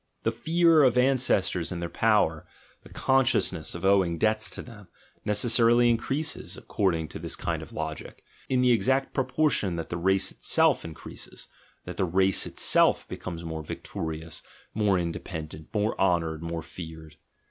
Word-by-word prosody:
The 115 - +1
fear 165 +6 +3
of 125 -3 +4
ancestors 120 -10 +2
and 90 - -4
their 85 - -3
power, - - +1 0.3
the - - -16
consciousness 125 -12 +1
of 85 - -5
owing 95 -4 +3
debts 110 +3 +2
to - - -6
them, 105 -5 -13 0.4
necessarily 120 +2 +4
increases, 135 +8 -2
according 95 -9 -1
to 80 - -8
this 80 0 -5
kind - - -3
of - - -11
logic, 80 0 -6 0.3
in 130 -1 +2
the 125 -1 +4
exact 130 +5 +1
proportion 130 - +1
that 85 -1 -5
the 85 - -3
race 95 +2 +1
itself - - +2
increases, 80 -2 -10 0.4
that - - -7
the - - +1
race 95 +1 +2
itself - - +2
becomes 85 -2 -7
more 80 -1 -4
victor 80 +1 -5
ious, 80 0 -8 0.3
more 105 -3 +2
independent, 80 -3 -5
more 105 0 0
honoured, 80 -4 +1
more 85 -1 -4
feared. 80 -2 -10
95 Hz, 155 wpm, -27 LUFS, 85-120 Hz, 0.4 s, of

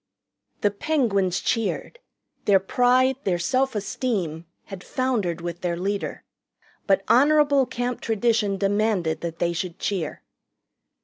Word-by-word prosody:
The 205 - +2
Penguins 200 - 0
cheered. 230 - -2 0.5
Their 200 -2 +5
pride, 250 +6 +3
their 180 -3 +1
self 260 +7 0
esteem, 195 -6 -2 0.2
had 195 -3 -9
foundered 215 -10 -1
with 175 0 -5
their 175 -1 -1
leader. 200 +3 -3 0.6
But 195 -1 +3
honorable 285 0 +4
Camp 245 0 -3
tradition 220 -2 +1
demanded 200 -4 0
that 165 -1 -4
they 170 0 0
should 175 0 -4
cheer. 185 -7 -3
205 Hz, 120 wpm, -24 LUFS, 180-245 Hz, 0.6 s, Their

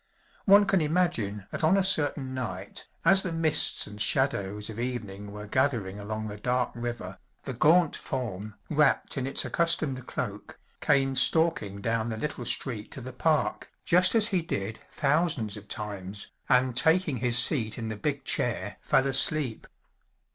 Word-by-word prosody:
One 200 +1 +6
can 195 -3 +2
imagine 150 - -1
that - - -5
on 170 +5 +4
a 195 - +2
certain 145 -7 0
night, 100 -7 -6 0.2
as 190 0 +7
the 185 - -4
mists 165 -2 +3
and 105 0 -9
shadows 105 -6 +1
of 110 0 -7
evening 105 -5 -5
were 105 0 -8
gathering 110 -5 -1
along 110 +1 -5
the 105 -1 -7
dark 125 +3 -1
river, 120 -6 -6 0.2
the 135 - -5
gaunt 160 +6 +3
form, 110 -5 -5
wrapped 150 -2 +1
in 130 -1 -3
its 135 - +1
accustomed 155 -7 -1
cloak, - - -6 0.2
came 135 -2 +1
stalking 130 -9 +2
down 115 +1 -1
the 110 - -4
little 150 - -4
street 115 -5 -1
to 135 - -7
the 130 +1 -8
park, 155 +3 0 0.2
just 180 +4 +4
as 220 -1 +4
he 185 -3 0
did 110 -8 -4
thousands 145 - 0
of 105 -1 -11
times, 100 -1 -7 0.2
and 125 -1 +3
taking 160 0 +2
his 120 0 +2
seat 115 -6 +3
in 115 -2 -5
the 110 - -4
big 140 +5 -3
chair - - -2
fell 135 - +2
asleep. 135 -2 +2
130 Hz, 160 wpm, -27 LUFS, 105-155 Hz, 0.2 s, as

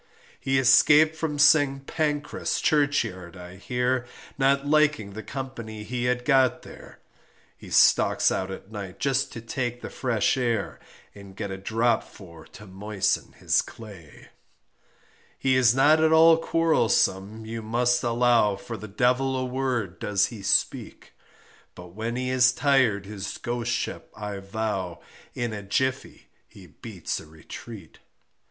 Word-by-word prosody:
He 135 0 0
escaped 150 +4 +5
from 160 -2 -3
St. 145 -2 +4
Pancras 150 -2 -2
churchyard 115 - 0
I 90 +1 -11
hear, 125 +3 -1 0.3
Not 140 0 +2
liking 150 -9 +2
the 110 - -7
company 115 -5 -7
he 120 +2 -3
had 125 0 -1
got 130 -4 +3
there, - - -13 0.6
He - - -13
stalks - - +4
out 95 - -2
at 95 +2 -9
night 100 -4 -7
just 135 0 0
to 115 - -7
take 120 +1 -4
the - - -7
fresh 120 -2 0
air, 115 -5 -2 0.3
And 100 -1 -13
get 100 -1 -5
a 95 - -5
drop 115 +4 +1
for 85 -5 -14
to 105 - -14
moisten 100 +1 -2
his - - +1
clay; 100 - -13 1.1
He 130 -1 +1
is 125 -2 +4
not 155 +4 +4
at 160 - +3
all 165 +1 +7
quarrelsome 110 -11 +1
you 115 +1 -6
must 120 +2 +1
allow 120 -3 +2
For 100 - -8
the 110 - -9
devil 125 +5 +1
a 130 - -2
word 125 -7 -3
does 100 -1 +1
he 110 - -9
speak, 100 - -1 0.6
But 90 0 -11
when 110 +6 -5
he 125 0 -2
is 125 -1 +4
tired 130 -8 +2
his 100 -1 -6
Ghostship 120 -1 -3
I 105 -2 -6
vow 95 -3 -4 0.4
In 120 -2 -3
a 105 - -5
jiffey 130 +7 -2 0.2
he 95 - -15
beats 90 +3 -6
a - - -13
retreat. 80 +4 -12
120 Hz, 145 wpm, -25 LUFS, 100-130 Hz, 1.1 s, all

